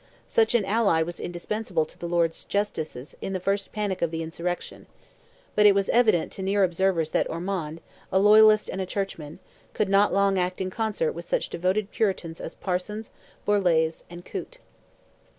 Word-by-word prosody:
Such 450 - +2
an 220 -5 +3
ally 200 -6 +2
was 175 +1 -7
indispensable 175 -1 -2
to - - -15
the 170 - -6
Lords 170 -1 +1
Justices 160 -10 -3
in 195 - -4
the 185 - -1
first 195 +2 -1
panic 205 -3 -2
of 170 - +2
the 165 0 -3
insurrection; 170 +2 -5 0.7
but 210 0 +6
it 200 - +6
was 195 -1 +1
evident 220 -8 +3
to - - -6
near 195 +1 +2
observers 175 -3 +1
that - - +1
Ormond, 165 -2 -4 0.3
a - - +3
loyalist 215 +1 +6
and 190 - -4
a 185 - -3
churchman, 170 -7 -4 0.4
could 210 - 0
not 200 +1 +4
long 195 -1 +2
act 180 0 -1
in 185 -1 -2
concert 215 -7 -1
with 170 +1 -9
such - - 0
devoted 190 +4 -1
Puritans 185 -6 -1
as - - -7
Parsons, 205 +4 -4 0.3
Borlase, 170 -6 +2
and 175 0 -10
Coote. - - -7
190 Hz, 175 wpm, -26 LUFS, 170-205 Hz, 0.7 s, but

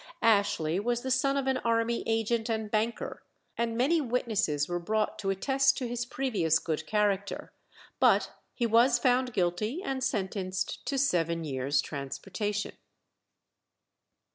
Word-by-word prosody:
Ashley 200 -6 +2
was 240 +3 -1
the 260 - -2
son 275 +2 +2
of 275 - -1
an 265 -1 +1
army 230 0 0
agent 225 +1 0
and 220 -2 -2
banker, 225 +2 -1 0.3
and 230 -1 -1
many 305 +7 +3
witnesses 220 - 0
were 175 0 -2
brought 215 +5 -1
to 195 - -2
attest 270 +7 +2
to 255 - -2
his 240 0 -3
previous 200 - +1
good 160 -1 -3
character, 205 -2 0 0.5
but - - +4 0.2
he 240 - 0
was 235 +2 +5
found 250 +1 +2
guilty 210 - -1
and 265 -7 -2
sentenced 190 -4 -2
to 275 - -1
seven 170 - +1
years' 140 -1 0
transportation. 195 +9 -4
220 Hz, 140 wpm, -29 LUFS, 185-245 Hz, 0.5 s, was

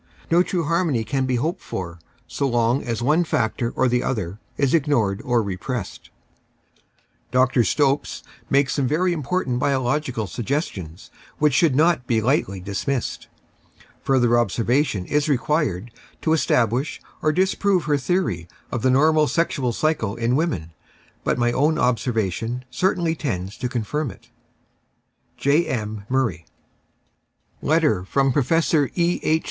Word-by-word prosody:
No 170 +1 +6
true 180 -1 -1
harmony 165 -6 +1
can 130 +4 -1
be 130 - +1
hoped 155 +8 -1
for 85 -2 -6 0.3
so 140 - -1
long 120 +1 +2
as 115 -1 -3
one 155 +7 +3
factor 115 -6 -1
or 130 - +2
the 125 0 +1
other 105 -7 -3 0.2
is 140 -2 +1
ignored 130 -11 +1
or 120 -2 +1
repressed. 100 +3 -5 1.2
Dr. 130 0 +3
Stopes 140 +6 0 0.3
makes 140 0 +3
some 140 -3 0
very 175 +6 +1
important 150 -5 -1
biological 130 -3 0
sugges 130 - -2
tions 85 -1 -10 0.3
which 150 -2 +3
should 150 -1 +3
not 155 -3 +3
be 115 -2 +2
lightly 110 -5 0
dismissed. 105 +7 -3 0.7
Further 120 -3 +3
obser 120 0 0
vation 125 -7 +1
is 150 +5 0
required 125 - 0 0.3
to 160 - +2
establish 125 -3 +1 0.2
or 155 - +2
disprove 190 +2 +1
her 145 -2 +1
theory 130 - -1 0.2
of 120 - -2
the 130 - +2
normal 155 +3 +4
sexual 140 -7 0
cycle 115 -6 0
in 120 +1 0
women, 135 - -1 0.5
but - - 0
my 120 -1 +2
own 150 +5 +2
observation 120 -1 -1
certainly 175 0 +1
tends 100 - -4
to 125 - -3
confirm 130 +5 -2
it. 115 +4 -15 1.1
J. 150 +5 +2
M. 105 -3 -4
MURRAY. 115 -11 -1 1.1
Letter' 150 - +2
from 135 +7 +1
Professor 150 +1 +2
E. 175 0 +1
H. 160 +1 +2
130 Hz, 140 wpm, -22 LUFS, 115-155 Hz, 1.2 s, No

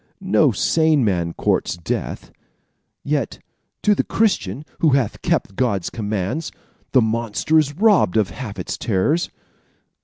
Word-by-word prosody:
"No 185 -7 +3
sane 155 - +2
man 85 -4 0
courts 85 - 0
death; 85 - -4 0.7
yet - - -1 0.5
to 210 - +5
the - - 0
Christian, 150 - 0
who 160 - +4
hath 130 -6 0
kept 100 - -1
God's 100 -7 0
commands, 110 - -3 0.4
the 130 - +5
monster 115 +7 +1
is 145 -2 0
robbed 200 - +3
of 100 -5 +1
half 105 -1 -7
his 90 - -5
terrors. 120 - +1
120 Hz, 130 wpm, -21 LUFS, 100-160 Hz, 0.7 s, to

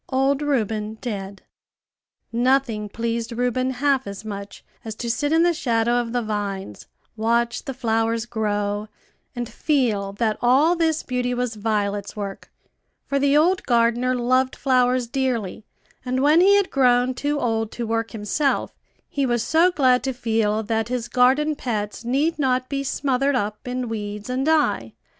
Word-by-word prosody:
OLD 270 +1 +1
REUBEN 220 -6 -1
DEAD. 200 -4 -6 0.9
Nothing 240 -3 +1
pleased 230 +2 -3
Reuben 250 +2 0
half 265 0 0
as 200 +2 -7
much 200 -1 -7 0.2
as 220 -1 -6
to 235 +1 -2
sit 290 +4 -1
in 325 +1 +4
the 345 0 +3
shadow 240 -4 +1
of 230 -1 -6
the 245 0 -1
vines, 200 - -4 0.3
watch 235 +1 0
the 270 - -4
flowers 225 -2 0
grow, 210 -2 -2 0.5
and 240 -1 -3
feel 225 -11 0
that 215 +1 -1
all 275 +8 +4
this 320 -2 0
beauty 250 -1 -1
was 245 -1 -2
Violet's 205 -2 -2
work; 200 -2 -6 0.5
for 280 - 0
the 280 +1 +3
old 355 +5 +3
gardener 240 +1 +2
loved 255 +2 +1
flowers 255 -2 +2
dearly; 235 -5 -2 0.4
and 255 +1 -1
when 305 +4 +5
he 400 +2 +6
had 400 -1 +2
grown 250 -1 +3
too 290 +3 -1
old 225 -3 -1
to 240 - -4
work 225 0 -1
himself, 230 +6 -1 0.3
he 280 -2 -1
was 240 -2 0
so 330 +7 +4
glad 260 -7 +3
to 265 0 -1
feel 220 -3 0
that 225 0 -1
his 245 -2 -2
garden 265 +5 +3
pets 215 -5 -4
need 285 +7 0
not 255 -2 +1
be 275 -1 -2
smothered 275 0 0
up 210 -1 -3
in 250 0 -3
weeds, 210 +1 -5
and 265 +3 -1
die. 290 - +1
245 Hz, 160 wpm, -23 LUFS, 220-270 Hz, 0.9 s, he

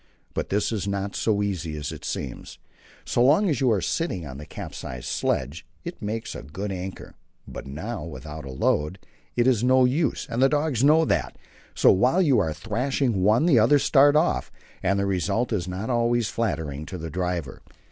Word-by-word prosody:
But - - -3
this 105 +3 0
is 100 -3 -2
not 100 0 -2
so 105 -2 +1
easy 85 -6 -3
as 75 -1 -4
it - - -9
seems. 65 - -5 0.5
So 120 - +2
long 155 +11 +5
as 140 - -1
you 130 -3 +4
are 100 -4 +2
sitting 95 - -2
on 65 -1 -8
the 75 - -9
capsized 60 -1 -7
sledge 70 +7 -1 0.2
it 175 - -7
makes 110 +2 -4
a - - -7
good 95 +9 -5
anchor, 95 0 -6 0.3
but - - -8
now 100 - -5
without 75 0 -8
a 70 - -8
load 75 +6 0 0.4
it 120 - +2
is 125 -4 +3
no 130 0 +5
use, 145 +6 0
and 120 - -2
the 135 - +6
dogs 145 -4 0
know 155 +3 +5
that. - - -1 0.4
So - - +6
while 125 - +3
you 145 - +4
are 80 -6 0
thrashing 115 - -1
one 110 - +4
the 150 -9 +5
others 135 +6 +4
start 145 0 +5
off, 155 +3 +1 0.3
and 95 +1 +1
the 100 - +1
result 100 +5 0
is 95 -4 -1
not 95 +6 -3
always 120 -1 +1
flattering 80 -10 -3
to 90 - -6
the 80 -1 -6
driver. 90 -6 -3
105 Hz, 195 wpm, -25 LUFS, 85-125 Hz, 0.5 s, the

